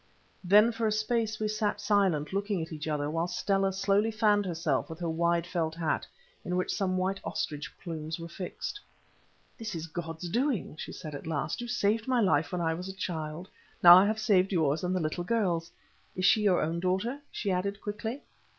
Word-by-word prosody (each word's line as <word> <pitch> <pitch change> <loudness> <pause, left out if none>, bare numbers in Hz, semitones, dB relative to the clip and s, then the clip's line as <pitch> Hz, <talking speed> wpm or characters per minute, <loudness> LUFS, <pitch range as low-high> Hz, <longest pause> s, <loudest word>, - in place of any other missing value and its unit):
Then 210 +5 +6
for 225 -1 -1
a - - +1
space 220 0 0
we 215 - 0
sat 215 0 -1
silent, 190 -7 +1
looking 200 -1 -1
at 160 0 -5
each 155 0 -5
other, 150 -2 -1
while 165 +3 -1
Stella 195 +1 +1
slowly 200 +3 +2
fanned 210 -2 +2
herself 160 -8 -1
with 160 - -7
her 175 0 -3
wide 170 +1 +1
felt 165 -3 -2
hat, 165 -2 -1 0.4
in 180 - -2
which 185 - 0
some 185 -3 0
white 190 +1 0
ostrich 150 0 -3
plumes 160 -2 -5
were 165 - -6
fixed. 180 - -6 0.8
"This 215 -4 -5
is 165 -1 -4
God's 165 +1 -6
doing," 240 - -1
she - - -6
said 155 -2 -8
at 145 - -7
last. 155 - -2
"You 240 - -5
saved 225 -1 0
my 255 -2 +2
life 160 -8 +2
when 180 - -2
I 165 -1 +1
was 180 +3 -5
a - - -5
child; 170 -2 -4 0.4
now 175 0 +12
I 190 +2 +6
have 215 +1 0
saved 195 -3 +3
yours 160 -3 +1
and 180 +1 0
the - - +1
little 160 +2 -2
girl's. 175 -5 0 0.4
Is 185 - 0
she 215 +2 +5
your 195 -4 +3
own 165 +2 -1
daughter?" 190 +9 -1
she 200 - -2
added, 200 +2 -1
quickly. 220 +6 -5
185 Hz, 205 wpm, -29 LUFS, 165-210 Hz, 0.8 s, now